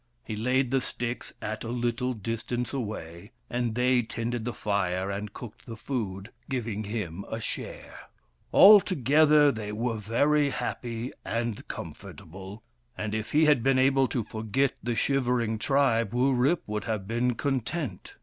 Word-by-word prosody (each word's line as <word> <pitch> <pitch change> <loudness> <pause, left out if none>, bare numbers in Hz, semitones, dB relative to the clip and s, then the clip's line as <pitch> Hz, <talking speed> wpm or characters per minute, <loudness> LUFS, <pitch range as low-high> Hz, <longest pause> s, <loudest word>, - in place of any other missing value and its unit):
He 110 - -5
laid 125 +3 +1
the 135 -1 +2
sticks 120 0 -4
at 110 0 -4
a - - -5
little 120 +1 -1
distance 115 +3 -3
away: 105 -5 -5 0.2
and 120 -2 -1
they 125 0 +3
tended 115 0 -3
the 120 - -1
fire 95 -2 -1
and 100 +1 -4
cooked 115 +2 -11
the 115 - -6
food, 110 -5 -4 0.2
giving 115 -5 -2
him 100 -4 -4
a 110 - -3
share. 110 - -6 0.5
Altogether, 150 - +7
they 110 -3 -5
were 115 +2 -2
very 140 +8 +2
happy 120 -2 -4
and 115 -2 -3
comfortable, 95 +5 -9 0.3
and 105 0 -3
if 110 +1 -3
he 155 +2 +5
had 150 -5 +4
been 135 +2 +3
able 135 0 +4
to 120 -3 -2
forget 110 +6 -1
the 120 0 -2
shivering 120 -4 +1
tribe, 120 -5 +2
Wurip 130 +5 +2
would 105 0 -3
have 110 -4 -3
been 120 +2 0
content. 135 - -3
120 Hz, 150 wpm, -28 LUFS, 110-130 Hz, 0.5 s, Altogether